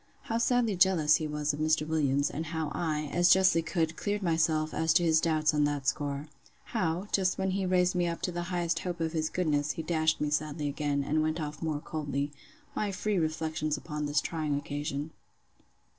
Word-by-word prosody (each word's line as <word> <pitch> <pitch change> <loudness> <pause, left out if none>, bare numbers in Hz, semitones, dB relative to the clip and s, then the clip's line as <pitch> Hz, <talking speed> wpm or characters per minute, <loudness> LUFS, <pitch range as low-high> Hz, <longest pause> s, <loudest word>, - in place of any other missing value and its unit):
How 230 0 -1
sadly 235 -3 +2
jealous 175 -4 +4
he 155 - -3
was 150 0 -1
of 145 - -5
Mr. 155 0 +1
Williams; 145 -3 +1
and 160 +2 -4
how 160 -2 -3
I, 155 -3 -1
as 175 +1 +4
justly 185 -3 +5
could, 165 -1 -1
cleared 205 0 -2
myself 160 -2 +1
as 160 0 +2
to 175 +1 +4
his 160 -1 +4
doubts 155 -1 +2
on 150 -1 +2
that 145 -2 -2
score. 145 +2 -1 0.4
How, 180 -3 -2
just 185 -2 +1
when 190 0 0
he 195 +1 -1
had 185 - -1
raised 180 -1 +3
me 175 -1 +1
up 170 0 -4
to 180 - 0
the 175 0 -3
highest 175 -2 0
hope 175 -2 -4
of 165 -1 -1
his 160 -1 -1
goodness, 150 -4 0
he 160 - -5
dashed 160 -1 +1
me 150 0 -1
sadly 150 0 -1
again, 145 0 -1
and 155 +3 +1
went 155 +2 -1
off 150 -1 -5
more 155 -3 -1
coldly. 145 -3 -3 0.4
My 210 -1 -1
free 195 +1 -1
reflections 155 -1 -1
upon 150 -2 -4
this 145 0 +2
trying 155 -4 -2
occasion. 145 +1 -4
160 Hz, 205 wpm, -29 LUFS, 150-175 Hz, 0.4 s, justly